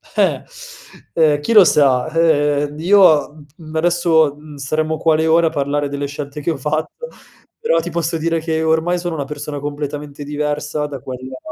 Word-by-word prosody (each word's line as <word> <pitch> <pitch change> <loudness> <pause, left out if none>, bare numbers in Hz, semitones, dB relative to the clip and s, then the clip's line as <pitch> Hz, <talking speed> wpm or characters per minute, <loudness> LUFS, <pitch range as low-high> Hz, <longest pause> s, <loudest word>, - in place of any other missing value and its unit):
Eh! - - +1 0.7
Ehm, 155 -3 +3
chi 150 +11 -1
lo 210 -3 +9
sa? 140 -6 +3
Ehm, 150 -3 +1
io, 175 -4 +5
mhmm, 150 -1 -15
p 145 - -31
mhmm, 155 0 -10
adesso, 160 -3 +2
mhmm, 150 0 -13
staremmo 155 +3 -2
qua 160 0 +2
le 160 +1 +1
ore 165 +1 +4
a - - +2
parlare 145 0 -1
delle 140 0 -3
scelte 145 +1 -7
che 160 - -1
ho 155 - -4
fatto, 155 - -3 0.5
però 475 +2 +1
ti - - -4
posso 165 0 -2
dire 165 +1 -1
che 160 0 -1
ormai 160 +2 +1
sono 175 -1 -4
una 145 - -2
persona 150 0 -6
completamente 145 0 -6
diversa 150 0 -2
da 140 -2 -7
quella, 130 0 -8
150 Hz, 190 wpm, -18 LUFS, 145-165 Hz, 0.7 s, lo